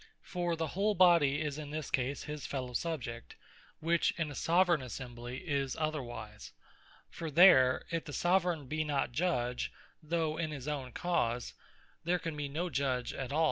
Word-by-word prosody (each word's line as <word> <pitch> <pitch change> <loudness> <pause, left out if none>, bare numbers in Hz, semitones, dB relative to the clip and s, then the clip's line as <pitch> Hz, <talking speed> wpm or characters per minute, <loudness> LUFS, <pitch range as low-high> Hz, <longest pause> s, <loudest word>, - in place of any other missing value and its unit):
For 175 -2 -1
the 160 -1 -2
whole 205 +3 +1
Body 170 -6 +5
is 150 -1 -3
in 150 -1 -6
this 155 -1 -5
case 135 +1 -1
his 150 -1 -5
fellow 130 -3 -4
subject, 120 -5 -4 0.4
which 165 +1 +2
in 160 -3 -1
a - - -6
Soveraign 170 0 +3
Assembly, 125 +1 -7
is 140 -3 0
otherwise: 120 -9 -4 0.6
for 165 - -5
there, 140 -6 +6
if 165 -1 -2
the 150 - -7
Soveraign 175 -2 +1
be 155 +4 -1
not 145 -4 0
Judge, 125 -5 0 0.3
though 160 -1 -1
in 160 -1 -1
his 145 -3 -6
own 140 -4 -3
cause, 120 -9 -1 0.5
there 175 +2 +2
can 165 -3 -4
be 145 -1 -3
no 165 +6 -2
Judge 130 -2 -1
at 135 -1 -5
all. 150 - 0
150 Hz, 170 wpm, -32 LUFS, 130-165 Hz, 0.6 s, there